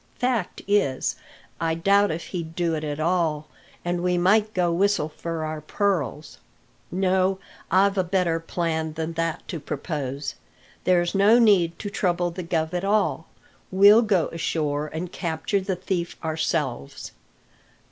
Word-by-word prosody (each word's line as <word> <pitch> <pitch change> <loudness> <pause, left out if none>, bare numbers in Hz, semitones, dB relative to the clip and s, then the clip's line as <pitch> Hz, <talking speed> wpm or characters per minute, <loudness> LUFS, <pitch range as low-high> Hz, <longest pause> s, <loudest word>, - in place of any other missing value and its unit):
Fact 245 -7 -1
is, 200 -11 +1 0.4
I 165 -1 0
doubt 200 +4 +3
if 165 +1 -4
he'd 165 -3 -5
do 170 -1 0
it 155 -1 -2
at 150 0 -3
all, 155 -3 0 0.4
and 175 0 -1
we 180 0 +1
might 210 +4 +3
go 175 -2 +2
whistle 190 -2 +1
for 165 0 -4
our 155 0 -4
pearls. 155 -4 -2 0.5
No, 190 +1 +1 0.3
I've 195 +1 +3
a - - +3
better 175 -2 +1
plan 160 -1 -2
than 160 +1 -4
that 165 0 -2
to 170 - -4
propose. 140 -2 -4 0.5
There's 175 -1 +3
no 205 +4 +5
need 195 -8 +4
to 205 - -6
trouble 175 -3 0
the 180 +2 -6
guv 165 -1 -1
at 180 0 -1
all; 205 +2 +1 0.4
we'll 205 +3 +7
go 200 -7 +1
ashore 155 -3 -1
and 170 +3 -5
capture 170 +3 -1
the 190 0 -2
thief 180 -1 -3
ourselves." 155 - -2
175 Hz, 145 wpm, -24 LUFS, 160-195 Hz, 0.5 s, we'll